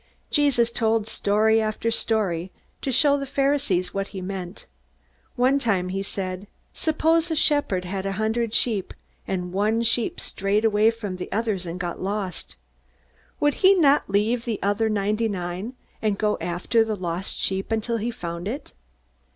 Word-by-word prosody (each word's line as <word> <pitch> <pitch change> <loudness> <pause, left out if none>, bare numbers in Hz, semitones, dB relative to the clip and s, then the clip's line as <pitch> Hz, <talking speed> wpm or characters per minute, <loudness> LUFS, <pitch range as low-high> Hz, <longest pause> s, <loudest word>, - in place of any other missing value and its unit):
Jesus 270 -6 +3
told 225 -2 +1
story 220 +1 +2
after 215 +1 -1
story, 190 -6 0 0.3
to 270 - -1
show 285 +3 +4
the 275 - -4
Pharisees 275 -10 +1
what 195 0 -2
he 195 - -7
meant. 185 0 -6 0.7
One 260 +3 +3
time 195 -8 0
he 195 +1 -2
said: 190 0 -4 0.3
"Suppose 320 +1 +1
a 320 - 0
shepherd 290 -12 +2
had 190 +1 -3
a 195 - -1
hundred 220 +2 0
sheep, 215 -4 +1 0.3
and 180 -1 -3
one 215 +4 +1
sheep 230 0 +1
strayed 200 +3 0
away 215 0 +4
from 215 -5 -4
the 180 - -6
others 210 -5 -1
and 170 +2 -5
got 175 -1 -4
lost. 195 -1 -4 0.8
Would 290 0 +3
he 390 +1 +7
not 295 - +4
leave 215 +4 +1
the 230 -4 -1
other 205 +3 +1
ninety 215 +2 0
nine, 185 +4 -4 0.3
and 210 -2 +1
go 210 0 +1
after 180 +6 +1
the 220 -1 -2
lost 180 0 -3
sheep 195 +2 -1
until 225 +1 0
he 225 +2 -2
found 170 -5 -5
it? 260 +8 -5
215 Hz, 160 wpm, -24 LUFS, 190-235 Hz, 0.8 s, he